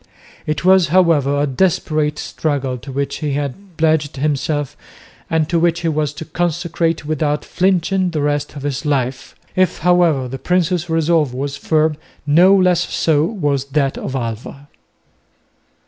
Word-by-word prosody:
It 155 +3 -2
was, 190 -2 +5
however, 155 -5 +3
a 145 - +2
desperate 150 0 0
struggle 135 -6 -2
to 135 +3 -9
which 140 +1 -2
he 150 -3 -2
had 145 +6 -5
pledged 155 -2 +1
himself, 145 0 -1 0.5
and 160 -2 +1
to 170 0 +1
which 170 0 +1
he 165 - 0
was 150 -2 -1
to 160 +2 -8
consecrate 170 -1 -1
without 150 -1 -1
flinching 185 0 +1
the 155 -4 -2
rest 145 0 -1
of 140 - -7
his 145 -1 -3
life. 130 -3 -2 0.2
If, 185 0 +2
however, 170 -7 +3
the 135 +2 -6
prince's 180 0 0
resolve 160 -4 +1
was 140 +1 -3
firm, 155 0 +1 0.3
no 175 +7 +5
less 180 -2 +2
so 155 -2 +2
was 145 - -1
that 140 -1 0
of 130 - -5
Alva. 125 +4 -5
155 Hz, 150 wpm, -18 LUFS, 140-170 Hz, 0.5 s, was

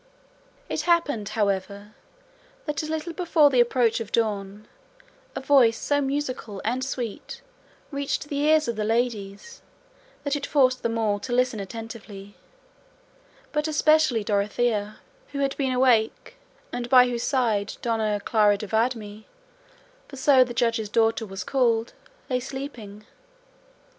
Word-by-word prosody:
It - - -2
happened, 290 -12 +1
however, 200 0 -2 0.7
that 300 -2 -2
a 310 - -5
little 315 +2 -4
before 330 -4 +3
the 255 - +3
approach 240 -1 +3
of 225 -3 -6
dawn 210 -2 -2 0.7
a - - -2
voice 260 -5 +4
so 285 0 0
musical 270 -7 -3
and 250 +4 -1
sweet 245 -5 -5 0.5
reached 280 0 -3
the 285 -1 -3
ears 305 +1 +3
of 235 -2 -3
the 215 - -1
ladies 225 - -2 0.6
that 285 0 -1
it 285 - -4
forced 255 -3 +3
them 230 0 -1
all 210 -2 0
to 245 - -7
listen 250 -2 +1
attentively, 205 -1 -9 1.2
but 300 +1 -1
especially 310 -6 +3
Dorothea, 210 +1 -1 0.4
who - - -4
had 275 -1 0
been 270 -2 -1
awake, 250 - +1 0.4
and 245 0 -4
by 250 -1 +7
whose 240 -1 -3
side 225 -7 0
Dona 220 -3 0
Clara 210 -2 +3
de 210 - -6
Viedma, 220 -1 -2 0.8
for 275 - -11
so 265 -1 +5
the 250 - -7
Judge's 230 -3 0
daughter 225 0 +1
was 195 0 -6
called, 235 -4 +1 0.3
lay 255 -2 0
sleeping. 245 -6 -8
235 Hz, 140 wpm, -25 LUFS, 215-275 Hz, 1.2 s, by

